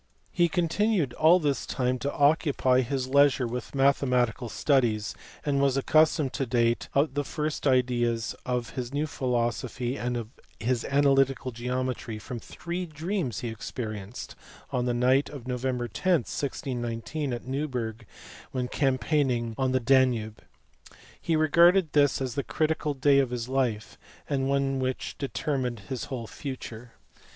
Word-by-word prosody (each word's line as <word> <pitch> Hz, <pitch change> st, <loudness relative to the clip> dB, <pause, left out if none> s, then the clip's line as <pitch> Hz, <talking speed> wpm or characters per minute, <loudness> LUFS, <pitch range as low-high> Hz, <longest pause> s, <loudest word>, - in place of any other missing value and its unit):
He 175 Hz, -1 st, +3 dB
continued 175 Hz, -, +1 dB
all 160 Hz, +7 st, +6 dB
this 145 Hz, -5 st, 0 dB
time 125 Hz, 0 st, 0 dB
to 140 Hz, +4 st, -2 dB
occupy 140 Hz, -3 st, +3 dB
his 130 Hz, +1 st, -2 dB
leisure 140 Hz, -1 st, +4 dB
with 120 Hz, +1 st, -5 dB
mathe 140 Hz, 0 st, +3 dB
matical 125 Hz, -2 st, 0 dB
studies, 115 Hz, -6 st, +1 dB, 0.3 s
and 140 Hz, -2 st, +1 dB
was 140 Hz, -1 st, +2 dB
accustomed 155 Hz, -1 st, +3 dB
to 135 Hz, -2 st, -2 dB
date 115 Hz, 0 st, +1 dB
the 145 Hz, 0 st, +2 dB
first 150 Hz, +1 st, -2 dB
ideas 120 Hz, -3 st, +1 dB
of 125 Hz, -2 st, -2 dB
his 125 Hz, -2 st, -5 dB
new 145 Hz, +2 st, 0 dB
philosophy 125 Hz, -1 st, -2 dB
and 125 Hz, 0 st, -2 dB
of 115 Hz, -2 st, -5 dB, 0.3 s
his 120 Hz, +1 st, 0 dB
analytical 135 Hz, -2 st, +2 dB
geometry 125 Hz, -1 st, -3 dB
from 120 Hz, +3 st, -6 dB
three 175 Hz, +8 st, -5 dB
dreams 155 Hz, -, -3 dB
which -, -, -4 dB
he 120 Hz, -, -3 dB
experienced 110 Hz, -1 st, -6 dB, 0.4 s
on 125 Hz, -1 st, 0 dB
the 120 Hz, -, +1 dB
night 130 Hz, +3 st, +3 dB
of 135 Hz, -4 st, -9 dB
Nov. 125 Hz, -1 st, -3 dB
10, 130 Hz, 0 st, +1 dB
1619, 125 Hz, -, -2 dB
at 120 Hz, 0 st, -5 dB
Neuberg 125 Hz, -5 st, -3 dB, 0.4 s
when 125 Hz, -1 st, -2 dB
campaigning 130 Hz, -3 st, +1 dB
on 130 Hz, +1 st, 0 dB
the 130 Hz, -, +2 dB
Danube. 120 Hz, -4 st, +2 dB, 0.8 s
He 165 Hz, -, +1 dB
regarded 170 Hz, +2 st, +4 dB
this 145 Hz, -2 st, +4 dB
as 130 Hz, -3 st, -2 dB
the 140 Hz, -, -2 dB
critical 155 Hz, -1 st, -1 dB
day 140 Hz, +1 st, +4 dB
of 135 Hz, -3 st, +2 dB
his 120 Hz, -1 st, -4 dB
life, 125 Hz, -5 st, -1 dB, 0.3 s
and 135 Hz, -2 st, 0 dB
one 135 Hz, -1 st, +1 dB
which 130 Hz, 0 st, -3 dB
determined 130 Hz, -4 st, -2 dB
his 130 Hz, -, -3 dB
whole 125 Hz, -4 st, -5 dB
future. 120 Hz, -2 st, -7 dB
130 Hz, 145 wpm, -27 LUFS, 120-145 Hz, 0.8 s, all